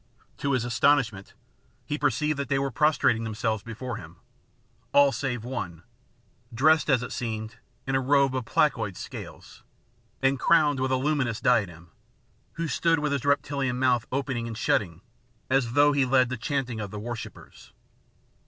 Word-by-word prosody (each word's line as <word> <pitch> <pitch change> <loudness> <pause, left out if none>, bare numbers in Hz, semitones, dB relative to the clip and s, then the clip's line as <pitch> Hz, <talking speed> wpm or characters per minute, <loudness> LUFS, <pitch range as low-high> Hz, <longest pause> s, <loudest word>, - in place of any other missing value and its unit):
To 140 0 -1
his 125 -2 0
astonishment, 115 -4 +1 0.5
he 150 - -2
perceived 145 +1 0
that 140 -2 -3
they 140 - +2
were 135 0 -1
prostrating 120 -4 +2
themselves 110 -1 -2
before 115 +1 -6
him, 80 -4 -11 0.8
all 140 -1 +6
save 125 -2 -3
one, 90 -10 -5 0.7
dressed 155 +7 +3
as 125 -3 +3
it - - -6
seemed 110 -2 -4 0.3
in 135 - -2
a 135 - +2
robe 135 0 +3
of 130 -2 -2
placoid - - +1
scales, - - -9 0.6
and 135 0 +1
crowned 150 -4 +3
with 130 0 0
a - - +3
luminous 130 -4 0
diadem, 90 -9 0 0.6
who 165 0 -3
stood 165 +4 +2
with 150 0 -1
his 140 -2 -2
reptilian 140 -3 0
mouth 125 -3 +1
opening 130 -3 -2
and 115 -2 -6
shutting, 90 -7 0 0.5
as 130 -3 +1
though 145 +2 +5
he 140 -1 +2
led 130 -1 +3
the 130 - -2
chanting 125 -1 -2
of 105 -2 -4
the 105 - -7
worshippers. 115 +1 -9
130 Hz, 160 wpm, -26 LUFS, 115-140 Hz, 0.8 s, all